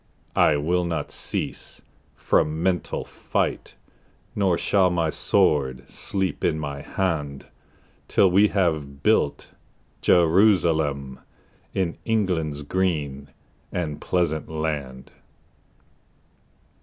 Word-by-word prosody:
I 75 - +4
will 90 +5 +1
not 80 -4 -3
cease - - -4 0.3
from 80 +2 +1
mental 90 -3 -1
fight, - - -3 0.6
Nor 95 -4 +2
shall 95 +2 +3
my 85 -3 0
sword 65 -4 +1
sleep 95 -2 -2
in 80 - +2
my 70 -2 -5
hand 75 -6 -2 0.6
Till 95 -2 +4
we 100 +4 +5
have 80 -8 -1
built 105 -9 +1 0.5
Jerusalem 80 -7 +3 0.6
In 90 -3 -1
England's 85 -10 -1
green 75 -5 -1 0.4
and 80 -5 -3
pleasant 80 -4 -1
land. 75 -5 -4
80 Hz, 95 wpm, -24 LUFS, 70-90 Hz, 0.6 s, we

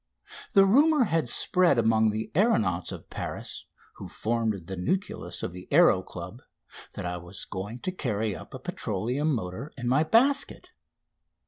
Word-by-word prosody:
The 195 -1 +7
rumour 290 +7 +5
had 165 - 0
spread 180 +1 +3
among 110 -1 +3
the 110 +1 -3
aeronauts 110 - +2
of - - -10
Paris, - - -6 0.3
who - - -8
formed 110 -5 -2
the 95 +2 -5
nucleus 185 - -2
of - - -2
the 90 +1 -10
Aéro 145 - +5
Club, 90 +7 -9 0.5
that - - -6
I 90 0 -3
was 90 +2 -7
going 100 +5 -6
to 185 - -2
carry 110 - -2
up - - -10
a - - -7
petroleum 140 +7 -2
motor 110 +3 -4
in 125 -1 -4
my 135 +5 +3
basket. 265 - +2
115 Hz, 155 wpm, -27 LUFS, -, 0.5 s, The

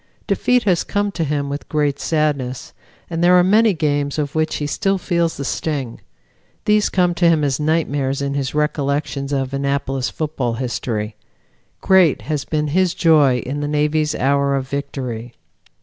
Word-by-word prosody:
Defeat 250 -1 +2
has 180 -5 +2
come 205 0 -1
to 170 - -2
him 145 -1 -1
with 140 +1 -6
great 145 -2 0
sadness, 145 -5 -1 0.3
and 165 0 -2
there 180 +1 +6
are 180 - +6
many 215 +4 +4
games 145 -2 -1
of 145 -1 -2
which 155 0 0
he 145 - -2
still 195 +6 0
feels 170 -3 -1
the 140 - -4
sting; 135 -5 -3 0.6
these 210 0 +3
come 180 -2 +2
to 170 0 +3
him 160 -2 +2
as 140 -1 0
nightmares 145 -3 0
in 140 0 -2
his 140 0 -2
recollections 140 -1 -1
of 135 -1 -1
Annapolis 140 -1 -1
football 145 -6 -2
history. 115 -3 -3 0.6
Great 185 -6 +4
has 150 -3 -3
been 150 -2 -1
his 185 +3 +1
joy 145 -7 +4
in 140 +3 -3
the 145 - -2
Navy's 150 +1 0
hour 140 +1 +1
of 135 -1 -2
victory. 125 -4 -5
145 Hz, 165 wpm, -19 LUFS, 140-165 Hz, 0.6 s, there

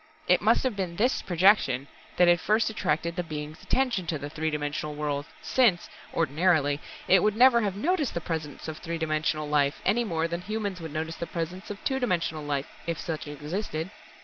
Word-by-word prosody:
It - - +4
must - - +3
have 255 -5 0
been 185 -3 -3
this 240 +8 +1
projection 170 -8 +3 0.3
that 180 - +6
had 175 0 +5
first 220 +2 +2
attracted 170 -5 -1
the 180 - 0
Being's 155 -1 -6
attention 240 -10 0
to 155 - -1
the 145 0 -7
three 160 0 -1
dimensional 150 0 -3
world, 145 0 -2 0.2
since, 225 -10 +3 0.2
ordinarily, 155 -2 +2 0.3
It 190 -1 +6
would 210 +1 +2
never 240 0 +6
have 200 -3 -1
noticed 305 - 0
the - - 0
presence 160 -4 -5
of 155 -1 -5
three 170 -1 -4
dimensional 155 -1 -1
life, 145 -1 +2
any 230 +5 +3
more 165 -6 -1
than 170 +1 -4
humans 205 -2 -3
would 160 -2 -6
notice 160 +2 -3
the 170 - -4
presence 175 +3 -5
of 205 0 -7
two 265 -1 0
dimensional 170 - -1
life 145 -1 -1 0.2
if 170 -2 -2
such 155 -2 -4
existed! 155 +4 -4
170 Hz, 195 wpm, -27 LUFS, 155-200 Hz, 0.3 s, that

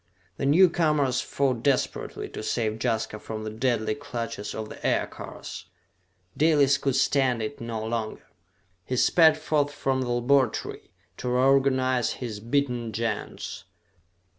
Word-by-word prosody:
The 135 - -1
newcomers 150 -5 +3
fought 130 -4 -1
desperately 135 0 -1
to - - -7
save 110 0 -1
Jaska 110 -3 -1
from 110 0 -6
the 110 - -4
deadly 110 -1 0
clutches 120 -6 -5
of 110 0 -4
the - - -11
aircars. - - -3 0.7
Dalis 145 -3 +4
could 135 -2 0
stand 135 -2 +2
it 110 +5 -5
no 115 -2 -4
longer. 110 -1 -3 0.6
He 125 - -3
sped 160 +4 +5
forth 150 -2 0
from 135 -2 -1
the 125 - -2
laboratory, 120 0 +1 0.3
to 125 - -3
reorganize 130 -1 +3
his 115 -5 -6
beaten 120 0 -1
Gens. 115 -4 -4
125 Hz, 130 wpm, -26 LUFS, 115-140 Hz, 0.7 s, sped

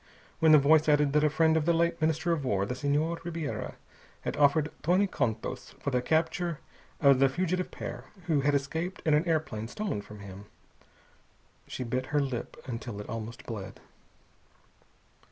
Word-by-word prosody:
When 160 -1 +5
the 155 - +10
voice 155 +2 +5
added 145 -1 +3
that 150 0 +4
a 150 - +4
friend 160 +1 +3
of 160 -2 +1
the 170 - +4
late 170 0 +1
Minister 160 +2 +1
of 160 -4 0
War, 100 -6 +1
the 125 - -3
Senhor 145 +5 0
Ribiera, 165 -4 -4 0.5
had - - -3
offered 150 +1 +3
twenty 180 +5 +3
contos 110 - -3
for 140 - -2
the 125 -1 +1
capture 165 +3 0 0.4
of 140 -3 +5
the 135 0 +5
fugitive 185 +5 -1
pair, - - -7 0.2
who 155 -5 +2
had 145 +1 +2
escaped 160 +7 -2
in 155 - +4
an 150 +4 +3
airplane 135 -10 -1
stolen 200 - -3
from 105 0 -12
him, 100 0 -10 1.2
she 130 - -4
bit 125 +2 -2
her 150 - +1
lip 135 -4 -3
until 120 -4 -5
it 105 - -7
almost 115 +1 -6
bled. 100 -4 -7
145 Hz, 170 wpm, -29 LUFS, 125-160 Hz, 1.2 s, the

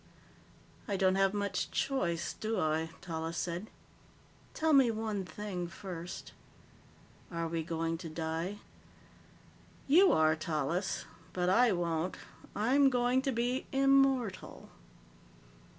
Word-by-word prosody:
"I 200 - -1
don't 185 0 +3
have 195 0 +3
much 200 -1 -2
choice, 175 - -1
do 220 -1 -2
I?" 160 0 0
Tallis 165 -1 -4
said. 175 +5 -3 0.9
"Tell 320 0 +2
me 270 -4 +6
one 215 -3 -2
thing 185 -3 -5
first: 175 -1 -7 1.0
Are 170 -1 -2
we 165 0 -2
going 165 0 -2
to 165 -2 -6
die?" 165 +5 -3 1.3
"You 360 +7 +6
are, 155 0 +4
Tallis. 160 +4 -2 0.3
But 180 0 0
I 235 +5 +5
won't. 170 -1 -1 0.4
I'm 265 +7 +4
going 250 0 +2
to 270 0 -1
be 245 +2 -1
immortal." 270 -6 +2
190 Hz, 115 wpm, -32 LUFS, 165-245 Hz, 1.3 s, me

